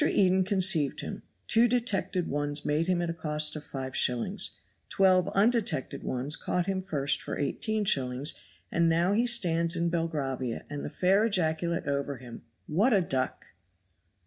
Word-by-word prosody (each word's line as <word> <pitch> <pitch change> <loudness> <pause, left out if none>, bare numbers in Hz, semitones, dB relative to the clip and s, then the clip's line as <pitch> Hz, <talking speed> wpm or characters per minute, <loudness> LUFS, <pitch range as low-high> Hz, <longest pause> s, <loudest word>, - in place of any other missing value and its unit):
Eden 190 -8 +3
conceived 185 - +1
him, - - -6 0.2
two 230 +2 +4
detected 195 -7 0
ones 145 +1 -1
made 155 +3 0
him 180 -1 +1
at 170 - -2
a - - -4
cost 150 -1 +1
of 155 - -6
5s., 130 -3 -1 0.4
twelve 185 -2 +3
undetected 220 - +1
ones 130 +4 0
caught 180 -1 -2
him 190 0 -2
first 140 -6 -1
for - - -5
18s., 145 - 0 0.4
and 170 0 +2
now 170 +4 +2
he 235 +4 +2
stands 170 -7 +2
in 170 0 0
Belgravia, 140 -7 -3
and 145 -1 -5
the - - -4
fair 190 +3 +2
ejaculate 170 -4 0
over 140 -1 -2
him, 120 -1 -11 0.2
"What 205 +11 +2
a 195 - +4
duck!" 130 -6 -2
170 Hz, 150 wpm, -28 LUFS, 145-190 Hz, 0.4 s, two